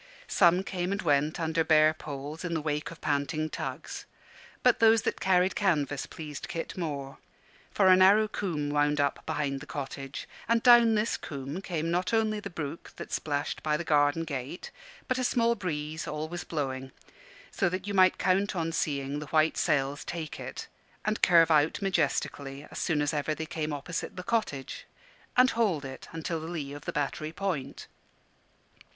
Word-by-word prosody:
Some 180 0 +4
came 180 -1 -3
and 200 - -1
went 150 0 +1
under 160 0 +1
bare 155 -1 +5
poles 150 +1 -7
in 170 -2 -2
the 160 - -1
wake 150 -1 -2
of 165 - -12
panting 155 +2 -1
tugs; - - -5 0.6
but 250 -2 +4
those 225 0 +5
that - - -1
carried 185 0 +3
canvas 150 - 0
pleased 150 -3 -7
Kit 165 - -5
more. 140 -6 -4 0.5
For 195 - +3
a 185 - +8
narrow 200 +4 +6
coombe 155 -9 -2
wound 145 0 +2
up 140 0 0
behind 140 -2 -1
the 150 - -11
cottage, 135 -1 -6 0.2
and 230 0 +2
down 240 -3 +7
this 215 +2 +1
coombe 140 +4 -6
came 165 -3 -2
not 180 +6 +1
only 215 -1 +1
the 200 - -6
brook 165 -2 -6
that - - -8
splashed 145 -1 -2
by 150 -1 +1
the 170 - -4
garden 145 0 +3
gate, 140 +1 -5 0.4
but 255 0 0
a - - 0
small 235 -1 +3
breeze, 155 -6 -4
always 155 +3 -4
blowing, 135 -4 -3 0.6
so 195 - +1
that 185 +1 -4
you 205 - -3
might 185 -2 +5
count 195 +2 +1
on 165 -2 -1
seeing 140 -3 -1
the 150 - -7
white 155 +1 +3
sails 140 0 0
take 165 -3 -5
it, - - -6 0.4
and 215 0 0
curve 165 -2 +6
out 150 0 +3
majestically 145 -6 -1
as - - -6
soon 150 -3 +1
as 145 - 0
ever 150 +1 -1
they 160 - -4
came 155 -1 -3
opposite 145 +4 -4
the 180 - -6
cottage, 180 - -2 0.5
and 255 +1 +6
hold 195 -11 +1
it 130 0 -8
until 165 +1 -3
under 160 - -7
the - - -6
lee 145 -5 -4
of 145 0 -9
the - - -2
Battery 150 +1 -2
Point. 165 -7 -3
160 Hz, 180 wpm, -29 LUFS, 145-185 Hz, 0.6 s, a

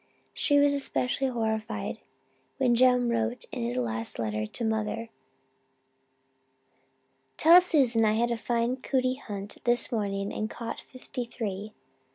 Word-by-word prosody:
She 290 -2 +2
was 285 0 +5
especially 270 -1 -1
horrified 220 -3 -2 0.6
when 255 -3 +3
Jem 250 0 +4
wrote 230 +1 -1
in - - -4
his 120 +2 -2
last 115 -2 -2
letter 110 -1 -2
to 230 - -4
mother, 220 +1 -2 2.3
'Tell 340 +3 +8
Susan 260 -10 +3
I 215 -1 +4
had 235 +2 +1
a - - +1
fine 235 +2 0
cootie 255 0 -1
hunt 200 -1 -6
this 240 +1 +2
morning 200 -3 -2
and 215 - -2
caught 230 0 -6
fifty 255 -1 -6
three!' 215 -3 -5
230 Hz, 135 wpm, -28 LUFS, 210-255 Hz, 2.3 s, Tell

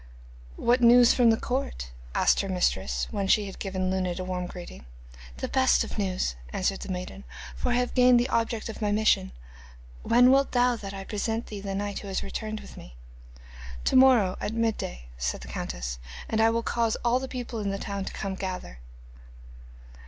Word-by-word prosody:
'What 245 +1 +2
news 240 0 +7
from 245 -2 +4
the 225 - +4
court?' 245 - -3 0.2
asked - - +3
her 195 - -5
mistress, 95 - 0
when 200 -1 -2
she 210 +2 +3
had 195 - -9
given 185 -1 -2
Luned 185 -1 -1
a - - -2
warm 180 -1 -3
greeting. 175 - -10 0.5
'The - - -3
best 260 -1 +3
of - - -6
news,' 185 - -1 0.2
answered 195 +1 -1
the - - -6
maiden, 185 +2 -6 0.3
'for - - -2
I - - +2
have 245 0 0
gained 250 -1 +6
the 240 - +1
object 230 -2 -1
of 225 0 -7
my 210 -1 +1
mission. 210 - +2 0.7
When 245 +2 +5
wilt 275 +1 +3
thou 245 0 +3
that 200 -3 -7
I 195 - -6
present 225 +3 -2
to - - -15
thee 205 -2 -5
the 195 -1 -4
knight 205 0 -3
who 200 - -9
has 195 - -2
returned 215 -1 -5
with - - -12
me?' - - -12 0.9
'To - - +1
morrow 250 -8 +5
at 215 - -3
midday,' 220 - -2
said - - -2
the 65 - -9
countess, - - -5 0.3
'and 220 - 0
I 225 - +5
will 230 0 0
cause 230 -1 0
all 240 +1 +3
the 265 - -5
people 245 -3 -5
in 205 -1 -2
the 195 - -2
town 200 0 -4
to - - -5
come 195 -1 -4
together. 185 - -6
205 Hz, 200 wpm, -27 LUFS, 185-235 Hz, 0.9 s, news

